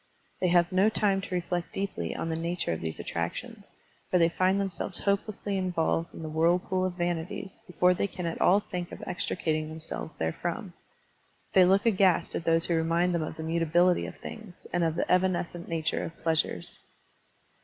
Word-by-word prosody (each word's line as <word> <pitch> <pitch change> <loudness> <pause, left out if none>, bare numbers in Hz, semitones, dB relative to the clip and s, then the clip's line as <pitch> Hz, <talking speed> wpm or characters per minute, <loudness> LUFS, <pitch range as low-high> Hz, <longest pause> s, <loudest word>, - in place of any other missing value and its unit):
They 185 - +2
have 175 +1 +4
no 190 +3 +4
time 200 -3 +1
to 185 -1 -4
reflect 175 -1 -2
deeply 190 - -3
on 165 - -3
the 160 - -1
nattire 170 - -1
of 80 - -5
these 80 -1 -3
attrac 85 0 -3
tions, - - -8 0.4
for 180 - +3
they 165 -1 +4
find 185 +3 +2
themselves 195 -1 -1
hopelessly 200 0 -1
involved 170 -2 0
in - - -9
the - - -4
whirlpool 175 +4 +2
of 185 - -1
vanities 175 +3 -3
before 180 0 +3
they 185 - 0
can 180 -2 -6
at 165 - -3
all 195 +3 +5
think 180 -4 -5
of - - -8
extricating 160 -5 -2
themselves 160 -1 -6
therefrom. 80 0 -3 0.8
They 185 -1 +7
look 195 +4 +3
aghast 190 -5 +3
at 165 - -3
those 165 0 +3
who 170 - 0
remind 165 +2 +2
them 170 - +1
of 155 - -4
the 160 - -5
mutability 170 +2 +2
of - - -8
things 215 -5 -10
and 175 0 +2
of 165 -1 +1
the 170 - -1
evanescent 180 -2 +1
nature 160 -1 -1
of 165 - -7
pleasures. 160 - 0
175 Hz, 185 wpm, -28 LUFS, 165-185 Hz, 0.8 s, They